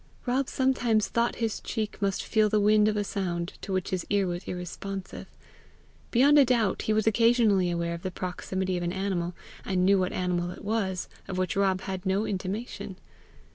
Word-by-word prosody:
Rob 255 +2 0
sometimes 245 -5 +2
thought 235 0 +1
his 225 -2 -2
cheek 215 -2 -4
must 195 -1 0
feel 215 -1 +2
the 215 0 +2
wind 210 +1 +5
of 215 -1 +1
a 205 - +1
sound 175 -3 -3
to 200 - -6
which 185 0 -1
his 185 -2 -1
ear 200 -1 +2
was 175 0 -4
irresponsive. 185 +2 -6 0.8
Beyond 285 +5 +5
a 280 - +7
doubt 235 -6 +1
he - - -1
was 215 0 +2
occasionally 220 -4 +4
aware 170 0 -1
of 170 - -6
the 185 - -3
proximity 185 +1 -3
of - - -3
an 175 0 -1
animal, 185 -3 -2 0.3
and 185 -1 +1
knew 195 0 +5
what 185 0 0
animal 180 -1 -1
it 180 - -9
was, 200 -4 -1 0.2
of 185 - -4
which 185 +4 -1
Rob 195 -1 +2
had 190 -1 -5
no 195 +2 +1
intimation. 195 0 -4
195 Hz, 190 wpm, -28 LUFS, 185-215 Hz, 0.8 s, a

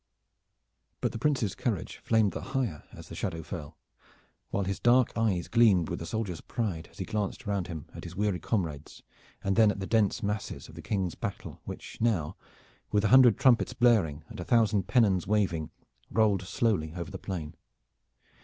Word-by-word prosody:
But - - 0
the 115 - -6
Prince's 130 -9 +1
courage - - -3
flamed 110 -3 +2
the - - -5
higher 130 - -3
as - - -11
the - - -10
shadow 80 -5 -3
fell, 75 -1 -7 0.7
while 100 - -1
his 95 +1 -3
dark 125 +1 +4
eyes 105 -6 0
gleamed 105 -8 +4
with - - -4
a 85 - -5
soldier's 100 -4 -3
pride 100 -10 -3
as - - -21
he 95 - -4
glanced 105 -1 -3
round 100 -3 -1
him 80 -5 -6
at - - -9
his 85 +1 -8
weary 100 -2 0
comrades, 80 -9 -3 0.4
and 95 0 +1
then 110 -2 +6
at 100 - -2
the 95 - -3
dense 110 +2 +1
masses 105 +1 -3
of - - -14
the - - -9
King's 95 -5 -1
battle - - -6
which - - -8
now, 95 -8 +1 0.6
with 105 -1 +2
a - - +3
hundred 125 -3 +7
trumpets 130 -4 +4
blaring 100 - +3
and 110 -4 -10
a - - -3
thousand 110 -2 +2
pennons 105 -8 +3
waving, 95 -7 +1 0.4
rolled 105 -2 +2
slowly 95 -4 0
over 85 +1 -5
the 95 - -6
plain. 85 -5 -5
100 Hz, 180 wpm, -29 LUFS, 90-115 Hz, 0.7 s, hundred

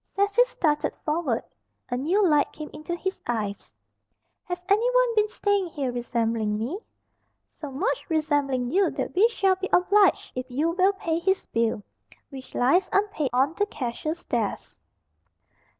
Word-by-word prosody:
Cecil 405 +5 +3
started 300 -10 0
forward. 300 -7 0 0.5
A 245 - -1
new 360 +10 +2
light 295 -3 +3
came 305 -1 -8
into 310 +3 -5
his 380 +2 -4
eyes. 210 -4 -3 0.7
"Has 355 0 -5
anyone 485 +3 +3
been 425 0 +3
staying 405 -3 0
here 280 -6 -3
resembling 230 -3 -1
me?" 255 - -3 0.7
"So 295 - -8
much 385 - -1
resembling 290 -6 0
you 390 +3 +3
that - - -4
we 400 +5 +5
shall 390 -5 +2
be 380 0 -4
obliged 400 +3 +3
if 255 0 -5
you 295 +7 0
will 375 +3 +3
pay 330 -4 -2
his 380 +2 0
bill, 225 -2 -1 0.5
which 265 -1 -10
lies, 315 +10 +3
unpaid, 400 -9 +1
on 265 +5 +2
the 410 +4 0
cashier's 305 - -4
desk." - - -3
325 Hz, 150 wpm, -25 LUFS, 260-390 Hz, 0.7 s, we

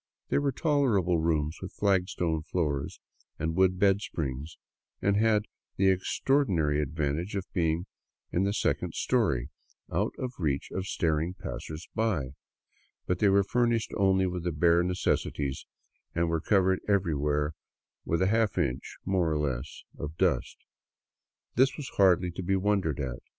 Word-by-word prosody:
They - - +2
were 140 -1 +1
tolerable 120 - +2
rooms, 80 -1 0
with 95 - -7
flagstone 90 -5 +1
floors 75 -4 -2 0.4
and 80 +1 -2
wooden 95 0 +3
bed 100 +1 +3
springs, 75 -3 -4 0.4
and 100 0 +2
had 105 0 +3 0.3
the 95 -1 +4
extraordi 135 +9 +1
nary 75 -5 +1
advantage 75 +6 -2
of 95 -2 -2
being 85 -1 +1 0.5
in 90 - +1
the 100 +1 +1
second - - -1
story, - - +1 0.4
out - - 0
of 130 -1 -4
reach 70 -5 -1
of 95 0 -3
staring 80 +1 0
passersby; 75 - -3 0.7
but 90 -1 -1
they 105 - +4
were 100 +1 +4
furnished 120 +1 +1
only 95 -1 +3
with 90 -2 -3
the 90 - -1
bare 85 +2 +4
necessities 90 -6 -1 0.5
and 85 0 +1
were 80 -1 0
covered 95 -1 +3
everywhere 75 -6 +1 0.5
with 85 +3 0
a - - +3
half 110 -2 +1
inch, 65 +2 -2
more 90 -4 +1
or 75 - +1
less, 70 -1 -3 0.2
of 75 +2 -5
dust. - - +1 1.0
This 130 +2 +3
was 145 -4 -6
hardly 90 -2 +4
to 90 - -6
be 95 +2 +1
wondered 95 -7 +1
at. 65 -4 -4
90 Hz, 150 wpm, -29 LUFS, 75-100 Hz, 1.0 s, the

